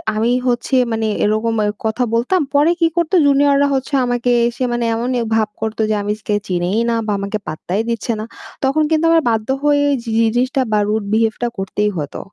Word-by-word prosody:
আমি 225 +3 +1 0.2
হচ্ছে 240 +2 0 0.2
মানে 220 -1 -1 0.2
এরকম 220 +2 +1
এ - - +1 0.2
কথা 220 +3 0
বলতাম 255 +11 +1
পরে 295 +4 +4
কি 335 - +4
করতো 340 +2 +1
junior-রা 280 0 +4
হচ্ছে 265 +2 -4
আমাকে 245 0 0 0.2
এসে 240 +2 -4
মানে 240 -1 -1
এমনই 240 +2 -1
ভাব 215 -1 +1
করতো 220 0 -2
যে 215 - +1
আমি 205 +1 -1
স্কেচ 205 -1 -1
চিনেই 180 +3 0
না 230 - +1
বা - - 0
আমাকে 200 +2 -3
পাত্তাই 175 +6 -3
দিচ্ছে 230 0 -2
না। 215 - -4 0.4
তখন 275 +4 +2
কিন্তু 320 0 +2
আমার 330 0 +4
বাধ্য 220 -1 -1 0.2
হয়েই 285 -1 +3
জি 230 - -5 0.2
জিনিসটা 255 +2 +1
বা 210 - +3
rude 210 -1 -1
behave 220 0 +2
টা - - +2
করতেই 205 +2 -1
হতো। 145 -2 -5
230 Hz, 200 wpm, -18 LUFS, 215-270 Hz, 0.4 s, পরে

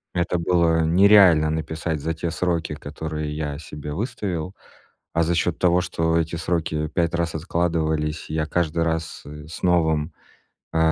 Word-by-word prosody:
Это 90 0 0
было 85 -1 +2
нереально 90 -3 +6
написать 80 0 -3
за 80 - -1
те 80 +1 -3
сроки, 85 -2 -1
которые 75 0 -5
я 75 -1 -3
себе 75 -1 -8
выставил. 100 - -3 0.6
А 85 - +2
за 85 +2 +1
счёт 85 0 0
того, 90 0 +3
что 80 -1 0
эти 80 0 -1
сроки 80 -2 -1
5 85 +1 0
раз 85 -1 -1
откладывались, 80 -2 -1
и - - -5
я 80 -1 0
каждый 85 -1 0
раз, 80 0 -3
э, 75 +1 -10
с 80 - -8
новым, 80 -4 +2 0.6
э, 80 - 0
80 Hz, 160 wpm, -23 LUFS, 80-85 Hz, 0.6 s, нереально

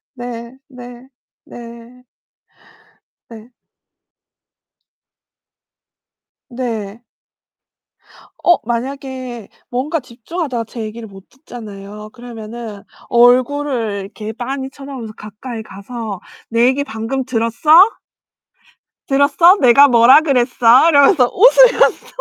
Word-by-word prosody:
네. 240 0 -8
네. 245 -1 -13 0.4
네. 235 +1 -13 1.3
네. 230 +2 -14 3.0
네. 230 -3 -6 1.4
어 350 - +4
만약에 255 -1 -5 0.2
뭔가 275 +7 -2
집중하다가 250 0 -6
제 230 +1 -9
얘기를 220 +1 -8
못 195 -1 -16
듣잖아요. 210 -6 -11
그러면은 230 -3 -10 0.3
얼굴을 245 -3 +1
이렇게 210 +2 -8
빤히 265 +3 -5
쳐다보면서 270 -5 -10
가까이 220 +3 -9
가서 210 0 -8 0.3
"내 230 +1 +2
얘기 265 +3 +1
방금 265 0 -4
들었어?" 230 +3 -3 1.4
"들었어? 285 +6 +4
내가 270 +3 +6
뭐라 245 +4 +6
그랬어?" 250 0 +3
이러면서 285 -3 +4
웃으면서 - - +4
245 Hz, 195 characters per minute, -16 LUFS, 225-270 Hz, 3.0 s, 내가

